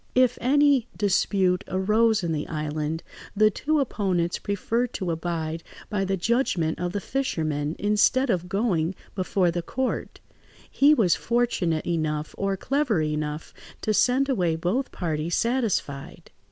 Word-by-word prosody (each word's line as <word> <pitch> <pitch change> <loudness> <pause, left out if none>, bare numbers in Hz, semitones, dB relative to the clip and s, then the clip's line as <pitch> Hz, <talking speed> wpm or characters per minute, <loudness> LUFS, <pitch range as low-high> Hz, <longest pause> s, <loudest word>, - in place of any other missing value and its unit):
If 255 -1 +3
any 275 -1 +4
dispute 190 -2 +2
arose 215 +2 +2
in 170 - -1
the 150 -1 -2
island, 155 +1 -3 0.3
the 215 +1 +5
two 305 +8 0
opponents 185 -9 0
preferred 230 +4 -1
to 180 -3 -2
abide 165 -1 -3 0.3
by 200 -2 0
the 195 0 -1
judgment 180 -6 0
of 180 0 -2
the 205 - -1
fisherman 155 - -2
instead 210 +5 +3
of 180 -2 -2
going 195 -4 0 0.2
before 185 -2 +1
the 175 +1 -2
court; 260 +9 -3 0.5
he 290 +2 +5
was 190 - +3
fortunate 225 -9 0
enough 155 -3 -2
or 195 -1 -1
clever 275 - 0
enough 150 0 -3 0.3
to 215 - 0
send 255 +5 +3
away 180 -11 +1
both 185 +11 -1
parties 165 -1 -2
satisfied. 230 - -2
190 Hz, 140 wpm, -25 LUFS, 165-235 Hz, 0.5 s, the